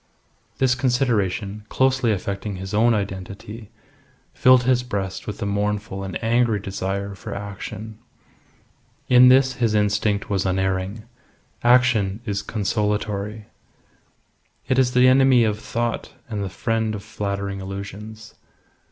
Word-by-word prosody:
This 130 -1 +3
consideration, 110 -6 0
closely 130 -3 +2
affecting 100 0 -3
his 95 +1 -7
own 115 +2 +4
identity, 100 +2 -6 0.6
filled 130 -1 +5
his 125 0 +3
breast 100 -6 -4
with 105 - -5
a - - -1
mournful 100 -1 -2
and 95 -2 -4
angry 115 -1 +2
desire 100 0 -3
for 95 - -7
action. 105 +2 -7 1.1
In 125 0 +8
this 130 0 +5
his 115 -3 +1
instinct 105 0 +1
was 100 -3 0
unerring. 95 +2 -1 0.6
Action 120 -5 +3
is 100 -3 -2
consolatory. 105 0 -2 1.2
It 130 0 +2
is 125 -1 +2
the 125 +1 +5
enemy 130 -1 +5
of 105 -1 0
thought 120 +1 -3 0.2
and 105 -4 -3
the 95 - -3
friend 110 +1 -1
of 100 - -7
flattering 100 -2 -4
illusions. 100 +3 -8
105 Hz, 125 wpm, -22 LUFS, 100-120 Hz, 1.2 s, In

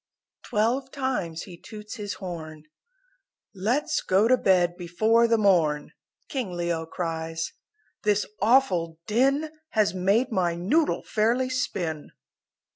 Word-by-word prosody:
Twelve 240 +6 0
times 250 - -2
he 180 -3 -11
toots 215 +2 -9
his 205 -2 -4
horn 160 -5 -7 0.9
"Let's 245 +11 0
go 195 +4 +3
to 255 - +6
bed 180 -6 +3
before 215 +7 +2
the 230 0 +3
morn," 165 -8 +2 0.4
King 245 -10 -3
Leo 170 -2 -2
cries, 165 -1 -4 0.5
"This 210 -1 +2 0.2
awful 195 -9 +3
din 275 +7 +2 0.2
Has 210 -5 +2
made 200 +8 +2
my 175 -5 +1
noodle 260 - +1
fairly 240 +4 +1
spin!" 170 - -3
200 Hz, 120 wpm, -26 LUFS, 170-240 Hz, 0.9 s, to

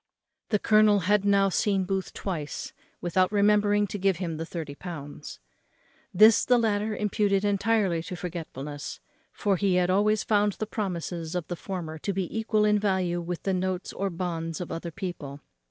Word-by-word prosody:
The 210 - +3
colonel 215 -1 +4
had 205 +2 +2
now 200 -1 +4
seen 195 0 +1
Booth 190 0 -2
twice 160 -7 -5 0.3
without 185 +2 +2
remembering 205 0 +3
to 205 +1 -5
give 190 -2 +2
him 170 -3 -3
the 165 +1 -5
thirty 160 -5 -5
pounds. 145 -3 -8 0.7
This 215 +4 +6
the 250 - +4
latter 215 -2 0
imputed 205 -1 +1
intirely 200 -4 +1
to 185 - -5
forgetfulness; 155 -4 -6 0.3
for 200 -2 0
he 195 -1 +2
had 180 0 +2
always 210 +2 +2
found 205 -1 +2
the 215 - -4
promises 175 -5 -4
of 175 -3 -2
the 175 - -2
former 170 -4 -6
to 200 - -2
be 190 0 -3
equal 220 -1 +2
in 210 0 +3
value 185 -4 0
with 170 0 -5
the 195 - 0
notes 185 0 -2
or 195 0 -2
bonds 165 -2 -3
of 180 - -5
other 170 +1 -4
people. 165 -6 -6
190 Hz, 170 wpm, -27 LUFS, 170-205 Hz, 0.7 s, This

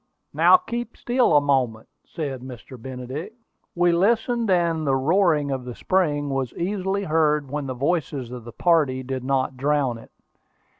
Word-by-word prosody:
"Now - - +6
keep 240 -7 -6
still 245 - +3
a - - +5
moment," 130 -6 0 0.2
said 140 -6 -5
Mr. 130 0 -10
Benedict. 130 - -7 0.4
We 175 0 +3
listened, 225 +5 +1
and 170 -4 +1
the 135 - +3
roaring 155 0 +2
of 130 -2 -3
the 125 -1 -7
spring 150 -7 0
was 135 -3 -2
easily 195 +2 -2
heard 150 -4 +1
when 145 -1 -3
the 130 - -4
voices 140 -3 -2
of 125 -2 -7
the 120 - -9
party 145 -5 +2
did 130 0 -4
not 130 0 0
drown 140 -3 0
it. - - -15
145 Hz, 160 wpm, -23 LUFS, 130-175 Hz, 0.4 s, Now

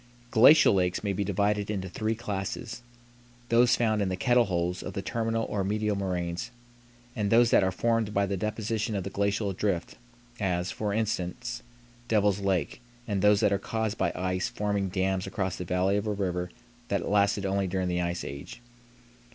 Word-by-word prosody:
Glacial 130 +5 +7
lakes 90 -1 0
may 100 -1 0
be 100 - -1
divided 100 +1 0
into 95 -3 -2
three 110 +4 -2
classes. 105 +1 -4 0.7
Those 120 +1 +5
found 110 -3 +1
in 100 - 0
the 95 - -1
"kettle 120 +4 +3
holes" 90 -2 -1
of 95 - -6
the 100 - -4
terminal 115 +1 -1
or 100 -2 -2
medial 105 +1 0
moraines, 90 -3 -3 0.7
and 105 -4 -1
those 115 +1 +5
that - - +5
are 95 - +1
formed 115 +2 0
by 100 -1 +2
the 100 0 -2
deposition 110 +2 -2
of 95 - -2
the 100 - -6
glacial 100 0 0
drift, 90 -3 -2 0.4
as, 90 -3 -1
for 105 -1 -3
instance, 110 +2 -2 0.5
Devil's 105 -3 +2
Lake, 95 -3 -1 0.3
and 100 -3 -1
those 105 0 +5
that 100 - +3
are 100 - +1
caused 110 +1 -3
by 85 -2 +1
ice 90 0 -1
forming 100 -2 -1
dams 95 0 -1
across 95 -1 -2
the 90 - -5
valley 90 +3 +1
of 105 +1 -2
a - - 0
river 90 -3 -2 0.4
that 100 - -1
lasted 100 -1 +2
only 95 0 0
during 95 0 -1
the 90 0 0
ice 85 0 -2
age. 70 +11 -8
100 Hz, 185 wpm, -28 LUFS, 95-110 Hz, 0.7 s, Glacial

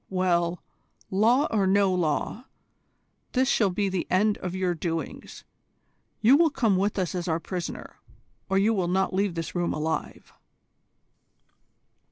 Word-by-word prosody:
Well, 175 -2 0 0.5
law 230 +9 +3
or 200 -3 +2
no 195 0 +3
law, 180 - -1 0.9
this 260 +1 +2
shall 210 -5 +3
be 200 +2 -1
the 190 -2 -2
end 205 +3 +2
of 180 0 -5
your 185 -1 0
doings. 165 -1 -5 0.8
You 240 +5 +6
will 330 0 +4
come 225 -8 +1
with 200 +3 0
us 185 -3 -1
as 180 -1 -3
our 165 -1 0
prisoner, 180 0 -6 0.5
or 195 - +2
you 210 +3 +3
will 185 -5 0
not 190 +2 0
leave 195 -2 0
this 165 -1 -4
room 175 -1 -1
alive." 155 +1 -4
190 Hz, 145 wpm, -26 LUFS, 175-205 Hz, 0.9 s, You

